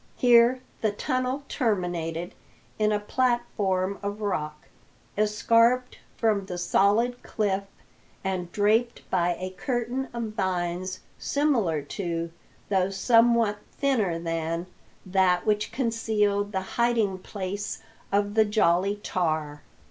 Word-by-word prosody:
Here 245 0 +5 0.2
the 215 - +2
tunnel 255 +4 -2
terminated 175 - -1 0.5
in 215 0 +3
a 210 - +1
platform 205 -5 0
of 205 +1 -4
rock, 155 -7 -3 0.5
escarped 230 +4 +2 0.2
from 210 -4 +1
the 180 - -4
solid 215 +7 +2
cliff, 200 -2 -1 0.6
and 185 -2 -2
draped 220 +4 +1
by 175 -1 +2
a 185 0 -5
curtain 240 +6 -2
of 235 -2 -4
vines 185 -2 -2 0.2
similar 230 - +1
to, 170 +2 -3 0.4
though 190 -2 +2
somewhat 230 0 +3
thinner 225 -12 +1
than, 165 0 -2 0.4
that 185 -1 +2
which 210 -1 +1
concealed 215 -4 0
the 190 -2 -1 0.2
hiding 225 -5 +2
place 200 +1 -5 0.3
of 205 +1 +1
the 220 0 +5
Jolly 200 -2 +2
Tar. 155 -4 -1
205 Hz, 110 wpm, -26 LUFS, 180-230 Hz, 0.6 s, Here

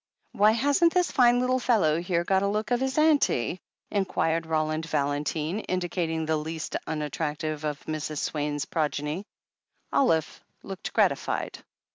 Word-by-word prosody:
"Why, 210 +2 +4
hasn't 285 +9 +3
this 360 -1 +2
fine 245 -2 +5
little 255 +1 +1
fellow 180 -11 +2
here 175 -1 0
got 190 +2 +2
a 200 - +1
look 215 +4 -2
of 245 - +3
his 265 +1 -1
aimtie?" 290 - +3 0.3
inquired 165 -5 0
Roland 155 0 -1
Valentine, 150 +5 -1
indicating 175 -4 -2
the 160 0 +1
least 160 +1 -5
unattractive 150 0 -3
of 150 -1 -4
Mrs. 155 -1 -4
Swaine's 145 -1 -2
progeny. 155 +3 -2 0.7
Olive 160 - +1 0.2
looked 195 -1 -6
gratified. - - 0
165 Hz, 135 wpm, -27 LUFS, 155-215 Hz, 0.7 s, fine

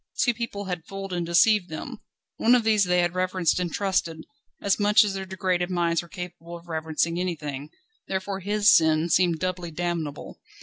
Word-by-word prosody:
Two 240 - +2
people 220 -3 -5
had 180 -3 -5
fooled 195 -1 -6
and 175 -1 -2
deceived 180 +3 +4
them. 210 +9 -7 0.4
One 240 +2 +4
of 245 - +2
these 215 -3 +3
they 180 0 +2
had 175 0 0
reverenced 185 -1 0
and 175 -2 -2
trusted, 180 -5 -1 0.3
as 200 +1 +1
much 210 +1 +5
as 205 -2 -2
their 190 -1 -5
degraded 185 -1 -1
minds 170 -2 +1
were 170 - -13
capable 175 -2 -8
of 170 +1 -17
reverencing 160 +1 -1
anything, 150 -5 -4 0.4
therefore 190 0 -3
his 205 +2 +3
sin 160 +1 +3
seemed 175 -1 +3
doubly 180 0 -3
damnable. 165 -3 -4
180 Hz, 180 wpm, -25 LUFS, 170-195 Hz, 0.4 s, much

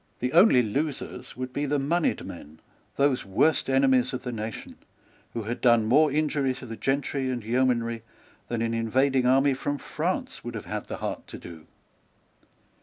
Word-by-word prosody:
The 125 +1 -2
only 170 - +6
losers 130 +1 -4
would 130 0 -5
be 145 +1 -1
the 145 +1 +1
moneyed 155 +5 0
men, 75 +2 -10 0.4
those 140 -2 +2
worst 135 +11 +2
enemies 130 -1 +3
of 130 - -4
the 125 - -3
nation, 110 -1 -6 0.6
who 115 - -3
had 115 +3 -4
done 120 -3 +4
more 150 +6 +4
injury 145 -3 0
to 130 - -10
the 115 -2 -6
gentry 135 +1 -1
and 125 -3 -3
yeomanry 115 -1 +1 0.5
than 115 -1 -2
an 115 0 -1
invading 130 +3 +2
army 135 +2 +4
from 145 +2 -2
France 185 - -3
would 120 -1 -6
have 110 - -6
had 105 0 -5
the - - -5
heart - - -5
to - - -8
do. 80 -2 -11
130 Hz, 175 wpm, -26 LUFS, 115-140 Hz, 0.6 s, only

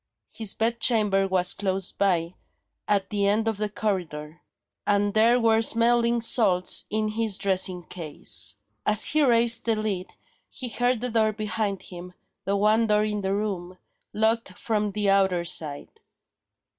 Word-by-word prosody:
His 220 -3 -3
bed 230 +1 -1
chamber 210 -5 +2
was 185 -1 +2
close 190 -1 -2
by, 175 -3 -1 0.5
at 200 0 0
the 200 -1 +1
end 215 +2 +1
of 220 -2 -1
the 210 0 -2
corridor; 175 -7 -4 0.5
and 205 0 +1
there 230 +3 +3
were 225 -1 +2
smelling 235 +1 +2
salts 200 -6 +4
in 215 0 -1
his 215 -2 -1
dressing 185 -2 0
case. 165 -3 -3 0.3
As 210 0 +4
he 310 - +3
raised 235 -2 +3
the 225 -1 +2
lid, 205 -4 -3 0.4
he 255 -3 -6
heard 245 0 -1
the 250 -1 -1
door 220 -1 +1
behind 210 -2 -3
him, 180 0 -10 0.3
the 200 +1 0
one 215 +3 +2
door 210 0 +2
in 210 -1 -3
the 195 0 -1
room, 185 -4 -4 0.3
locked 220 -3 -1
from 210 -2 -2
the 205 0 -2
outer 190 -3 +1
side. 150 -3 -2
210 Hz, 155 wpm, -24 LUFS, 190-225 Hz, 0.5 s, salts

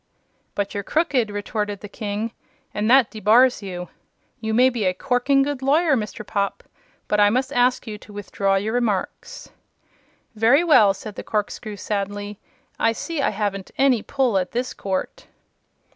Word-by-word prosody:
"But 200 -1 -2
you're 205 - -2
crooked," 260 - +1
retorted 205 0 -3
the 205 - -7
King, 210 +2 -4 0.4
"and 210 +1 -1
that 260 -2 +5
debars 225 +4 +4
you. 180 -3 -6 0.5
You 220 0 -3
may 250 +4 +4
be 230 -5 -2
a 185 0 +1
corking 270 +4 +2
good 285 -1 -3
lawyer, 295 +3 +3
Mr. 215 -2 -4
Popp, 200 0 -2 0.4
but 210 - +1
I 205 0 +6
must 255 +5 -1
ask 245 +1 +2
you 210 -2 -7
to 210 - -15
withdraw 200 -1 -1
your 210 +3 -1
remarks." 230 -6 -3 0.8
"Very 230 +8 +4
well," 215 - +5
said 210 +2 -8
the - - -7
corkscrew, 210 0 -3
sadly; 205 0 -4 0.4
"I 225 - +3
see 320 +6 -4
I - - +2
haven't 200 -2 -3
any 265 -4 +3
pull 250 -7 +1
at 180 - -4
this 250 +2 -2
court." 195 - -4
215 Hz, 160 wpm, -22 LUFS, 205-250 Hz, 0.8 s, I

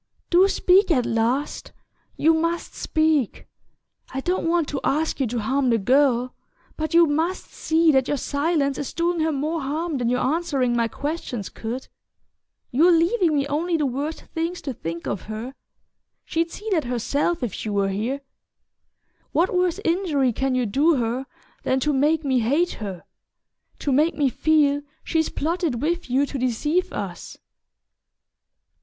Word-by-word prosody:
"Do 360 +3 +6
speak 385 0 +4
at 255 -8 +2
last 235 +6 -1 0.4
you 325 +2 +4
must 335 +1 -1
speak! 310 -6 0 0.7
I 265 - -3
don't 350 +3 -1
want 335 -3 +2
to 280 - -2
ask 310 +2 0
you 265 - +1
to 240 +2 -3
harm 260 +4 +1
the 230 - +3
girl; 250 +2 +2 0.4
but 315 +1 -2
you 340 0 +8
must 320 +5 -1
see 325 0 +3
that 265 -3 +2
your 290 - 0
silence 285 0 0
is 285 - -4
doing 340 0 0
her 320 0 +1
more 305 +3 -2
harm 300 +2 -2
than 240 -1 0
your 250 +1 +1
answering 275 -5 0
my 230 -1 +2
questions 280 - -4
could. 240 +4 -6 0.8
You're 325 +8 +5
leaving 335 0 +3
me 280 -1 +1
only 325 +4 0
the 300 - 0
worst 280 +5 -3
things 335 +2 -2
to 270 - -3
think 170 -5 -6
of 200 - -3
her... 220 +5 -5 0.7
she'd 330 +1 -1
see 420 +5 -9
that 320 -7 +1
herself 270 +6 -1
if 225 -6 -2
she 215 - -5
were 200 -1 +1
here. 230 +8 -2 1.1
What 345 +5 +2
worse 360 0 +1
injury 325 -8 +1
can 265 +2 0
you 250 -1 +1
do 290 +10 +3
her 245 +2 -2 0.3
than 260 - +1
to 300 +1 +1
make 300 +4 +2
me 260 -2 +2
hate 285 +10 +1
her 195 -5 -6 0.7
to 285 - -2
make 300 +5 +3
me 285 -3 +3
feel 290 +1 +2 0.2
she's 320 -1 0
plotted 320 -5 -1
with 335 +2 -1
you 265 +3 +3
to 275 -1 -5
deceive 295 +8 0
us?" - - -6
290 Hz, 160 wpm, -23 LUFS, 255-330 Hz, 1.1 s, you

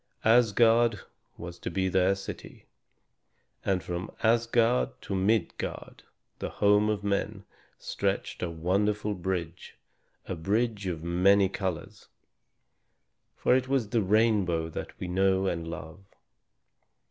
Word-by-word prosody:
Asgard 115 0 +4 0.4
was 85 0 -8
to - - -4
be 95 -1 -1
their 95 +1 +2
city, 95 - -9 1.0
and 95 -2 0
from 90 +1 -4
Asgard 115 - +2
to - - -6
Midgard, 95 0 -1 0.4
the - - -3
home 105 +1 +3
of 105 -1 -2
men, 100 0 -2 0.3
stretched - - -3
a 90 - -1
wonderful 100 +6 0
bridge, 90 -2 -4 0.5
a - - -4
bridge 105 +4 -1
of 80 -3 -4
many 95 +3 +4
colors. 95 -3 -5 1.3
For - - +3
it 130 0 0
was 130 -6 0
the 115 -1 +1
rainbow 100 -5 +2
that - - -7
we 90 - -4
know 95 +1 +2
and 85 -3 -2
love. 85 +1 -8
95 Hz, 120 wpm, -28 LUFS, 90-110 Hz, 1.3 s, Asgard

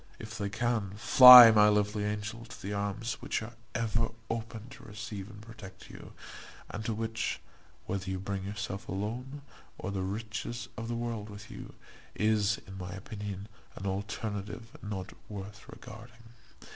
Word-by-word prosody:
If 110 +1 -9
they 100 -3 -3
can, 110 -2 -1
fly, 125 0 +11
my 105 -1 +6
lovely 105 0 +1
angel, 105 +2 -4
to 120 - -12
those 100 +2 -4
arms 105 +3 -2
which - - -2
are 115 +2 -9 0.2
ever 115 0 0 0.2
open 115 -1 -5
to - - -13
receive 105 -1 -7
and 105 - -12
protect 105 -4 -12
you; - - -12 0.6
and 110 - -5
to 115 - -1
which, 110 0 -2 0.5
whether 95 0 -3
you 95 - -2
bring 95 0 -4
yourself 105 +1 -5
alone, 125 +9 -4 0.3
or 100 - -5
the 95 -1 -2
riches 110 +4 -4
of 115 - -5
the 120 - -2
world 115 -3 -4
with 105 +1 -11
you, - - -10 0.4
is, 105 -1 +2
in 95 0 -10
my 90 -1 -6
opinion, 100 0 -7 0.3
an 95 - -8
alternative 105 +3 -4
not 100 -2 -6 0.2
worth 105 0 -9
regarding. 115 0 -13
105 Hz, 160 wpm, -30 LUFS, 100-115 Hz, 0.6 s, fly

